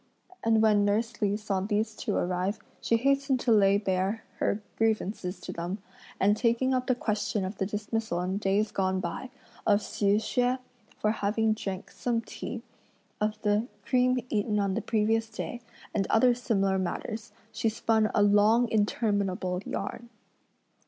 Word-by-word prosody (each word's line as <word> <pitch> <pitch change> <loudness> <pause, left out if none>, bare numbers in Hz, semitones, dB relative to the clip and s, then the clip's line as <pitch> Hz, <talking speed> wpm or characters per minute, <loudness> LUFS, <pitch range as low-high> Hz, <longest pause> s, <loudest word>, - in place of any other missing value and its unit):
And 225 -1 +4
when 210 -2 +5
nurse 215 +2 0
Li 205 0 +2
saw 210 -3 -1
these 215 +2 -1
two - - -2
arrive, 180 +3 0 0.2
she 230 - +2
hastened 275 +1 +2
to 245 - +1
lay 200 -2 +5
bare 195 +2 -1 0.2
her 205 - +1 0.2
grievances 210 -4 -1
to - - -6
them; 175 +3 -3 0.4
and 205 +2 +4
taking 235 +3 +2
up 255 0 0
the 255 - +3
question 210 -3 -1
of 190 +2 -6
the 190 - 0
dismissal 210 -2 -2
in 185 +2 -1
days 205 +1 +1
gone 190 -1 0
by, 185 +8 -4 0.4
of 205 -1 +5
Hsi 200 0 +1
Hsüeh, 245 +4 +1 0.4
for 215 - +1
having 220 +1 +1
drunk 195 -3 -5
some 240 -2 -1
tea, - - -7 0.6
of 210 0 0
the 210 +2 +2 0.2
cream 255 0 +3
eaten 210 0 +1
on 200 -1 +1
the 225 - -1
previous 225 +1 +1
day, 235 +2 -5 0.3
and 195 - 0
other 245 +2 +5
similar 195 -6 +1
matters, 215 +4 -4 0.2
she 225 0 0
spun 220 0 +2
a 205 - +5
long, 210 +4 +5
interminable 200 -4 0
yarn. 235 +4 -4
215 Hz, 160 wpm, -28 LUFS, 200-225 Hz, 0.6 s, when